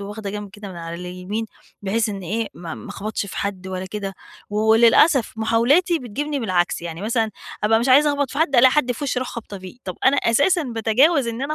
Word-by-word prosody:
وواخدة 205 0 -6
جنْب 205 -1 -6
كده 205 0 -10
من 185 - -9
على 165 0 -6
اليمين، 180 +5 -5 0.4
بحيث 215 +3 0
إن 200 -2 -5
إيه، 220 +6 -2
ما 170 -2 -7
ما - - -10
أخبَطْش 210 0 -4
في - - -9
حد 195 -2 -3
ولا 185 0 -4
كده، 195 -1 -5 0.4
وللأسف 225 +5 +4
محاولاتي 265 +11 +2
بتجيبني 280 +4 -4
بالعكس، 180 -7 0
يعني 170 -1 -6
مثلًا 225 0 0 0.3
أبقى 225 +1 +4
مش 240 - -1
عايزة 290 +3 +6
أخبَط 285 -2 -1
في 280 - -5
حد، 305 -4 +2
ألاقي 255 +2 +7
حد 255 -4 +2
في 265 - -6
وشّي 265 - -1
أروح 255 - -3
خابطة 215 -4 -7
فيه. 185 +6 -11
طَب 185 -2 -5
أنا 270 +2 +5
أساسًا 285 +9 +2
باتجاوز 245 +5 +2
إن 230 +3 -4
أنا 300 +2 -2
225 Hz, 215 wpm, -21 LUFS, 195-260 Hz, 0.4 s, ألاقي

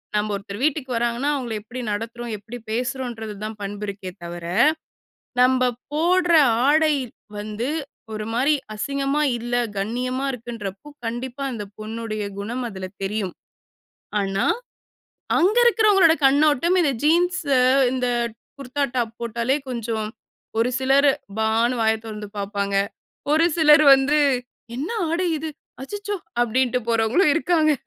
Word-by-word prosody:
நம்ப, 210 0 +1
ஒருத்தர் 200 +1 -7
வீட்டுக்கு 290 -3 0
வர்றாங்கன்னா, 240 +4 0
அவங்கள 245 -4 -3
எப்படி 245 +4 -8
நடத்துறோம்? 230 +2 -4
எப்படி 225 +4 -9
பேசுறோம்ன்றது 235 -2 -3
தான் 215 0 -5
பண்பு 205 +1 -5
இருக்கே 195 -2 -6
தவிர. 170 0 -7 1.0
நம்ப 255 0 +4 0.2
போடற 350 +2 +3 0.3
ஆடை 310 +1 +4 0.4
வந்து, 215 +4 -3 0.4
ஒரு 215 0 -4
மாரி 265 +6 +3 0.2
அசிங்கமா 275 +5 -1 0.2
இல்ல, 240 +1 -3 0.2
கண்ணியமா 250 +6 -2
இருக்குன்றப்போ, 230 -2 -7 0.2
கண்டிப்பா 250 +4 -4
அந்த 215 -4 -5
பொண்ணுடைய 215 -1 -4 0.2
குணம் 235 +5 -3
அதில 190 -2 -6 0.2
தெரியும். 195 -2 -2 0.9
ஆனா, 195 0 0 0.9
அங்கிருக்கறவங்களோட 420 -4 +5
கண்ணோட்டம், 300 +5 +4
இந்த 285 -5 +2
ஜீன்ஸ் 355 +4 +3 0.5
இந்த 255 -1 0 0.5
குர்தா 275 +1 -2
டாப் 230 -2 -1
போட்டாலே 235 +3 0
கொஞ்சம் 230 -3 -2 0.5
ஒரு 235 +2 +3
சிலர் 275 +2 +4 0.3
பான்னு 225 +3 +2
வாய 220 0 +4
திறந்து 210 -1 -6
பாப்பாங்க. 200 0 -2 0.6
ஒரு 320 +2 +5
சிலர் 305 -1 +7
வந்து, 275 +3 +2 0.6
"என்ன 285 +6 -3 0.2
ஆடை 340 +3 0
இது? 315 +1 -4 0.3
அச்சச்சோ!" 410 +7 -4 0.3
அப்படின்டு 250 +2 +1
போறவங்களும் 230 - +3
இருக்காங்க. 325 -2 +3
245 Hz, 120 wpm, -23 LUFS, 220-295 Hz, 1.0 s, சிலர்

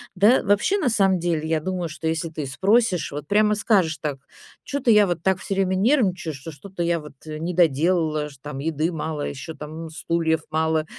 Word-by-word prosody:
Да, 210 +7 +5
вообще, 205 - +2
на 305 - 0
самом 195 -4 +3
деле, 165 -2 -1
я 160 -1 +1
думаю, 180 0 -3
что 155 +1 -5
если 165 +1 -1
ты 155 -3 -5
спросишь, 195 - +1
вот 145 +1 -6
прямо 210 +1 +3
скажешь 195 -7 +2
так: 145 -3 -3 0.4
"Чё-то 280 -4 -2
я 210 -2 +7
вот 175 -3 -2
так 190 0 +1
всё 195 - -3
время 190 -1 +1
нервничаю, 195 - +1
что 140 +4 -8
что-то 175 +5 -8
я 170 -1 +1
вот, 150 -2 -11
э, 155 0 -5
не 175 +2 -3
доделала, 160 -1 +2
ш 140 - -15
там 145 -2 -6
еды 160 +3 -1
мало, 155 -2 -3
ещё 135 +3 -6
там 155 +2 -8
стульев 160 0 -1
мало, 160 0 +1
165 Hz, 200 wpm, -23 LUFS, 155-195 Hz, 0.4 s, я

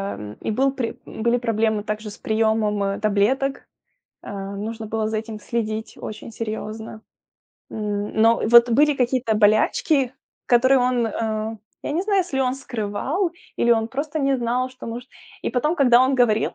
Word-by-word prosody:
м. 105 +1 -8
И - - -2
был 270 +5 +2
при 250 -4 -4
были 235 +2 0
проблемы 220 -3 0
также 215 0 -4
с 205 - -11
приемом, 220 -2 +1
э, 195 0 -1
таблеток. 220 +7 +1 0.6
Э, - - -8 0.3
нужно 220 +2 -5
было 220 0 -1
за 220 - -2
этим 215 0 -5
следить 220 -2 -3
очень 215 +1 -8
серьезно. 220 0 -6 0.7
Н 205 -1 -3
но 230 +1 +5
вот 235 +1 +7
были 295 +4 +4
какие-то 245 -3 +1
болячки, 230 +6 +3 0.3
которые 260 +2 +5
он, 245 -2 +1
э, 220 0 -2 0.3
я - - -3
не 345 +4 0
знаю, 400 -2 +2
если 280 -7 -2
он 255 0 +1
скрывал, 265 - -2 0.3
или 235 - +2
он 225 0 +1
просто 290 +4 -3
не 275 -1 +2
знал, 250 +1 0
что 255 - -11
может 240 +2 -6 0.3
И - - -1
потом, 285 +7 +1
когда 250 -3 +6
он 260 +1 +3
говорил 225 -4 +2
230 Hz, 165 wpm, -22 LUFS, 215-260 Hz, 0.7 s, вот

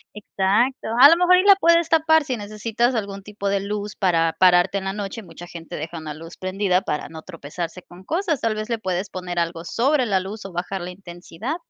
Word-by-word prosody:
Exacto. 210 +5 0
A 280 +2 +10
lo 335 - +6
mejor 360 +1 +5
y 370 - +3
la 400 -1 +8
puedes 335 -2 +3
tapar 320 -1 +4
si 255 -4 -3
necesitas 220 +4 -1
algún 200 -3 -4
tipo 200 -1 -4
de 200 0 +1
luz 205 +1 -4
para 165 -4 +1
pararte 180 +1 +4
en 190 - -4
la 195 0 -3
noche, 205 +2 -6
mucha 170 0 -12
gente 165 -1 -9
deja 160 +3 -6
una 155 -2 -6
luz 165 +3 -11
prendida 185 0 0
para 150 - -4
no 160 -1 -10
tropezarse 170 +1 -7
con 175 +2 -16
cosas. 330 - -1
Tal 225 -1 0
vez 215 +1 -5
le 230 - 0
puedes 190 -1 -3
poner 180 -1 -4
algo 170 0 -2
sobre 260 - +1
la 195 -3 +1
luz 195 +2 -7
o 195 - -7
bajar 180 +2 -4
la 180 - -6
intensidad. 180 - -7
195 Hz, 220 wpm, -22 LUFS, 175-235 Hz, -, A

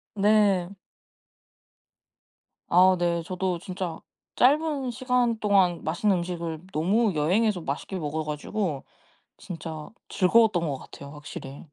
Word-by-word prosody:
네. 200 -3 +3 2.0
아 185 +1 +6
네. 170 -1 0
저도 180 +1 -2
진짜 180 -2 -5 0.4
짧은 285 -1 +2
시간 245 -2 0
동안 190 -5 +2
맛있는 180 +4 +1
음식을 170 -2 -4
너무 195 +6 +2
여행에서 180 +5 +1
맛있게 155 +7 -4
먹어 155 0 -3
가지고 150 +1 -3 0.5
진짜 160 -3 -8 0.2
즐거웠던 195 -3 +3
것 140 -3 -3
같아요 140 0 -11
확실히. 145 -2 -9
180 Hz, 235 characters per minute, -26 LUFS, 160-210 Hz, 2.0 s, 아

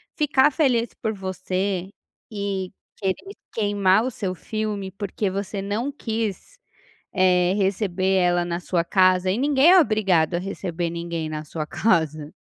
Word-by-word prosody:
ficar 295 -2 +3
feliz 250 -6 +1
por 220 - -1
você 190 -1 -3 0.4
e 200 -3 -3 0.2
querer 210 - -3 0.2
queimar 205 -1 +2
o - - 0
seu 195 -5 -3
filme 210 0 -4
porque 200 +1 -3
você 195 +1 -4
não 210 +8 -2
quis, 225 - -4 0.6
eh, 180 -1 +4
receber 190 -1 0
ela 175 -1 +2
na 170 0 -3
sua 175 -1 0
casa, 185 0 +3
e 200 - -1
ninguém 285 +4 +4
é 375 - +8
obrigado 195 - +2
a - - 0
receber 180 -2 -3
ninguém 170 -1 -4
na 155 0 -5
sua 155 +1 -4
casa. 155 -6 0
190 Hz, 145 wpm, -23 LUFS, 180-215 Hz, 0.6 s, é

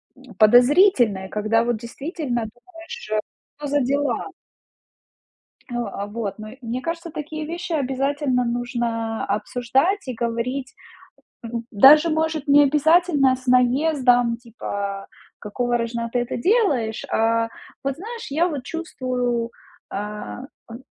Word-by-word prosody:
м, 255 -5 -16
подозрительные, 245 - +5
когда 215 +2 +1
вот 240 -2 0
действительно 255 +2 -4
думаешь: 330 +10 -14
"Что 215 0 -3 0.5
за 285 0 +1
дела?" 280 - 0 1.4
Э, - - -5
а, 205 -4 -3
вот. 210 -1 -5
Но 215 0 -8
мне 240 +2 -3
кажется, 335 +2 -4
такие 305 0 -5
вещи 345 +2 -5
обязательно 270 -2 0
нужно 235 -2 -2
обсуждать 260 - 0
и 250 - -3
говорить. 240 +3 -3 0.7
М, 230 0 -4
даже, 295 +10 +7
может, 315 -1 -1
не 290 +1 +7
обязательно 300 -1 +4
с 255 0 -16
наездом, 250 -1 +3
типа: 200 -4 -5 0.3
"Какого 240 +3 -1
рожна 235 0 -2
ты 245 - +1
это 240 - -3
делаешь?" 275 - +1
А, 230 0 +2 0.4
вот, 275 -1 -1
знаешь, 455 +6 -7
я 335 +5 +2
вот 280 -6 -5
чувствую, 250 -7 -2 0.4
а, 205 - -5 0.3
ам, 230 - -8
250 Hz, 125 wpm, -22 LUFS, 230-295 Hz, 1.4 s, даже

